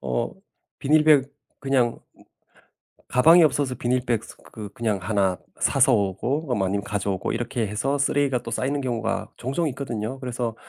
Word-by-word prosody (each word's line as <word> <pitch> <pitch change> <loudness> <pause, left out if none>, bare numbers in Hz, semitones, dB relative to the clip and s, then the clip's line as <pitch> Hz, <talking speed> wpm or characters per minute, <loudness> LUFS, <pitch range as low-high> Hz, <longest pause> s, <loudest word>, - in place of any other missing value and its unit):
어 65 -2 -2 0.5
비닐백 150 -2 +4 0.3
그냥 130 -4 +1 0.2
으 - - -20 0.9
가방이 165 +7 +6
없어서 145 -4 +1
비닐백 120 -2 0
스 - - -12 0.2
그 105 -2 -7
그냥 110 -4 -1
1 95 -1 +1 0.2
사서 135 -1 +4
오고 120 - -1
아 - - +2
아니면 100 0 0
가져오고 100 -2 -2
이렇게 120 0 -2
해서 130 +8 -1
쓰레기가 140 -2 +1
또 115 - -6
쌓이는 140 +5 -1
경우가 115 -3 -2
종종 135 +7 -1
있거든요. 125 -2 -4
그래서 120 -3 -3
125 Hz, 320 characters per minute, -24 LUFS, 110-135 Hz, 0.9 s, 가방이